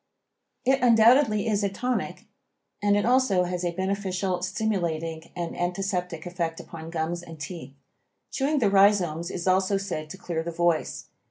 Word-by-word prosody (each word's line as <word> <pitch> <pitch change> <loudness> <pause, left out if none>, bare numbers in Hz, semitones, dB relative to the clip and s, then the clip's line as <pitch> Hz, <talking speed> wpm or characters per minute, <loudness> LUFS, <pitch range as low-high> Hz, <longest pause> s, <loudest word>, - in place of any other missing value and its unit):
It 265 +1 +3
undoubtedly 230 -1 +5
is 205 -2 +1
a 200 - +2
tonic 245 +6 -3 0.6
and 205 0 +3
it 205 - +1
also 245 -7 +3
has 180 0 -3
a 175 - +1
beneficial, 190 0 -2
stimulating 170 -5 -2
and 170 -1 -4
antiseptic 180 -2 -2
effect 170 -2 -3
upon 165 -1 -9
gums 165 +1 -2
and 165 -2 -11
teeth. 145 -3 -7 0.6
Chewing 285 +3 0
the 215 -7 +2
rhizomes 190 -5 +3
is 180 -1 -4
also 190 +1 +3
said 175 -6 -4
to 190 - -8
clear 175 -3 -3
the 165 - -4
voice. 170 -1 0
185 Hz, 155 wpm, -26 LUFS, 170-205 Hz, 0.6 s, undoubtedly